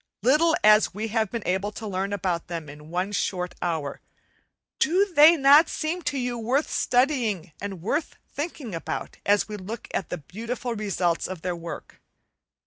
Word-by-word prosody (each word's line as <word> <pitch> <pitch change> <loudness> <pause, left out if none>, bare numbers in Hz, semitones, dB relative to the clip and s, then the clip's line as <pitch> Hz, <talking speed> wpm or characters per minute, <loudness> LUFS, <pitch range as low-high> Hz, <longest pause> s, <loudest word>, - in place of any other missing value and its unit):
Little 310 +6 +4
as 215 -2 +5
we 220 +2 -3
have 220 -1 0
been 230 -1 -5
able 190 +3 0
to 220 - -7
learn 195 0 -2
about 180 -4 -2
them 165 -3 -5
in 150 +1 -12
one 180 +4 -2
short 180 -3 -2
hour, 160 -5 -2 0.8
do 365 +6 +3
they 320 +2 +8
not 290 +3 +7
seem 330 +3 -2
to 285 - -4
you 245 -2 -2
worth 255 +7 0
studying 245 - +1
and 195 -4 -6
worth 290 - -1
thinking 290 - -5
about, 165 - -5
as 205 0 +3
we 210 -1 -6
look 210 +4 -7
at 185 - -2
the 180 - -3
beautiful 230 - -5
results 190 -6 -1
of 185 -3 -7
their 180 -1 -1
work? 170 0 -8
210 Hz, 170 wpm, -25 LUFS, 180-255 Hz, 0.8 s, they